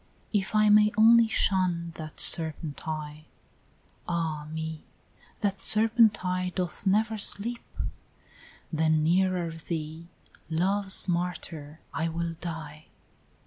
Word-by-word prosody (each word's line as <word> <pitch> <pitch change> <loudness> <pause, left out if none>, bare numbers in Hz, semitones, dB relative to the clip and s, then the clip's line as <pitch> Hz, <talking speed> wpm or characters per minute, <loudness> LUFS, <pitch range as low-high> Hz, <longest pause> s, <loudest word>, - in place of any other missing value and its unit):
"If 205 +1 -1
I 215 0 +4
may 210 0 +5
only 230 +1 +6
shun 180 -5 0
that 155 -2 -9
serpent 160 -2 +2
eye, 155 -1 -6 0.4
" - - -36
"Ah 160 -3 -3
me! 160 0 -6 0.6
that 200 -2 -1
serpent 220 -2 +3
eye 180 0 -1
doth 180 +2 -3
never 215 +3 +1
sleep; 230 +4 +2 0.6
" - - -25
"Then, 155 -1 +2
nearer 180 0 +1
thee, 160 0 -6 0.4
Love's 190 +4 +2
martyr, 170 -4 -4
I 165 0 -1
will 165 0 -3
die! 155 -3 -7
170 Hz, 115 wpm, -27 LUFS, 160-200 Hz, 0.6 s, only